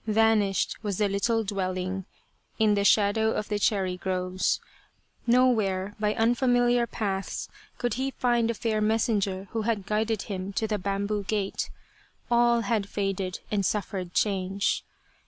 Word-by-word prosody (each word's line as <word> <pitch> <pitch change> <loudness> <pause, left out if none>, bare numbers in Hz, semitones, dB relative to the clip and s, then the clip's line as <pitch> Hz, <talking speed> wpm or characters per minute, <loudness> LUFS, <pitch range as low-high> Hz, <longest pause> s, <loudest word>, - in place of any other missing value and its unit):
Vanished 215 -2 +2
was 200 -3 -2
the 210 - +2
little 210 +3 +1
dwelling 185 -2 -2 0.5
in 215 -2 +4
the 200 -1 +1
shadow 215 +2 +4
of 210 - -3
the 210 -1 0
cherry 190 -3 +1
groves. 185 0 0 0.7
Nowhere 215 -6 +3
by 210 0 +1
unfamiliar 245 +1 +3
paths 195 -4 -3 0.3
could 245 -1 -1
he 265 +2 -1
find 240 -3 +1
the 230 - 0
fair 215 -1 -1
messenger 210 -3 +1
who 225 - -1
had 215 -3 -1
guided 215 0 0
him 195 -1 -5
to 220 - 0
the 210 -1 -1
bamboo 200 +2 -1
gate. 200 -1 -2 0.6
All 235 0 +4
had 210 -2 -1
faded 195 -2 -2
and 205 -2 +1
suffered 185 -2 -2
change. 195 -1 0
210 Hz, 140 wpm, -27 LUFS, 195-225 Hz, 0.7 s, in